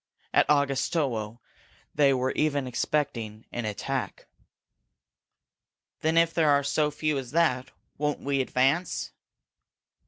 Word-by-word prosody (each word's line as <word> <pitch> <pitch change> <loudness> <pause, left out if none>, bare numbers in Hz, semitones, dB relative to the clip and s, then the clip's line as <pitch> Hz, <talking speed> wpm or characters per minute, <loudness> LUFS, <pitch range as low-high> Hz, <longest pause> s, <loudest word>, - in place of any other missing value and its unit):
At - - +4
Augustowo 135 -5 0 0.6
they 140 -2 +4
were 130 0 +1
even 145 -3 0
expecting 120 -4 -2
an 120 -2 -3
attack." 125 +5 -4 1.7
"Then 160 +1 +1
if 165 0 +4
there 160 -3 +3
are 140 0 +4
so 150 +2 +1
few 150 -1 -1
as 130 -2 -7
that, 130 -6 +2 0.3
won't 150 0 0
we 140 -1 0
advance?" 135 +7 0
140 Hz, 115 wpm, -27 LUFS, 125-150 Hz, 1.7 s, At